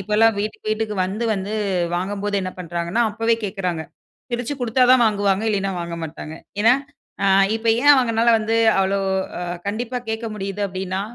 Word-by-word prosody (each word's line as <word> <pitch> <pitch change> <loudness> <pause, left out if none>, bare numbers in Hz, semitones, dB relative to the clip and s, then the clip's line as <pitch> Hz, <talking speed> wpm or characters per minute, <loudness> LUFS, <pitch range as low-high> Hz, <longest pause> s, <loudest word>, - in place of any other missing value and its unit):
இப்போலாம் 215 +3 +3
வீட்டுக்கு 215 +1 -4
வீட்டுக்கு 215 -1 -1
வந்து 205 +5 -3
வந்து 195 +2 -4 0.4
வாங்கும்போது 200 +2 -2
என்ன 185 - -3
பண்ணுறாங்கன்னா, 170 +4 -1
அப்பவே 225 +2 +1
கேட்குறாங்க. 185 -5 -2 0.5
பிரிச்சு 245 +4 -2
குடுத்தா 245 +1 +1
தான் 255 -1 +5
வாங்குவாங்க 205 -1 +1
இல்லைனா 195 -2 0
வாங்க 170 0 -5
மாட்டாங்க. 155 0 -8 0.3
ஏன்னா 235 +3 +6 0.5
அ - - +3 0.3
இப்ப 225 +1 -4
ஏன் 290 - +6
அவங்கனால 235 -3 +2
வந்து 220 +1 -1 0.2
அவ்வளோ, 195 +1 +2 0.4
அ - - -5 0.3
கண்டிப்பா 240 +4 -2
கேட்க 220 +1 -3
முடியுது 200 0 -5
அப்படின்னா, 190 0 -4
205 Hz, 155 wpm, -21 LUFS, 190-225 Hz, 0.5 s, ஏன்னா